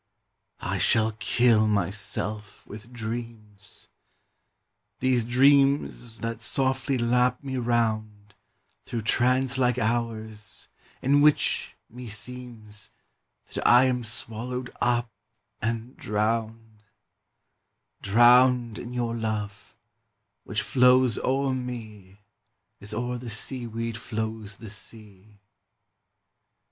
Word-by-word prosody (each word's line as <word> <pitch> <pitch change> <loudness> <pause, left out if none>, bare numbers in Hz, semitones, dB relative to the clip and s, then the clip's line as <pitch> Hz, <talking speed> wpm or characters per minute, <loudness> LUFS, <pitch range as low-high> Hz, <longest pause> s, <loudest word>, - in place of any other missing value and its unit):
I - - -2
shall 110 0 +3
kill 110 -1 +3
myself 105 +1 -2
with 110 +4 -11
dreams! 110 -3 -8 1.1
These 130 -2 +2
dreams 135 -2 +3
that 115 0 -4
softly 135 0 0
lap 125 +3 +1
me 135 -1 -4
round 110 -4 -1 0.5
Through 115 -2 -5
trance 130 +3 +2
like 125 -1 +2
hours 110 -3 -3 0.3
in 140 +2 +4
which 150 0 +2
meseems 115 -2 -4 0.6
That - - -3
I 125 +2 +7
am 125 -1 0
swallowed 120 +3 -3
up 120 -1 +1 0.5
and 115 +3 -3
drowned; 110 +1 -2 1.2
Drowned 120 +2 +4
in 120 +1 -7
your 120 -1 -2
love, 105 -2 -5 0.7
which - - -2
flows 125 -2 +4
o'er 135 +1 0
me 110 -6 -7 0.6
As 100 - -5
o'er 125 +2 -3
the 120 -1 -7
seaweed 115 0 -1
flows 110 -2 -5
the 110 -3 -9
sea. 105 -1 -6
115 Hz, 95 wpm, -26 LUFS, 110-125 Hz, 1.2 s, I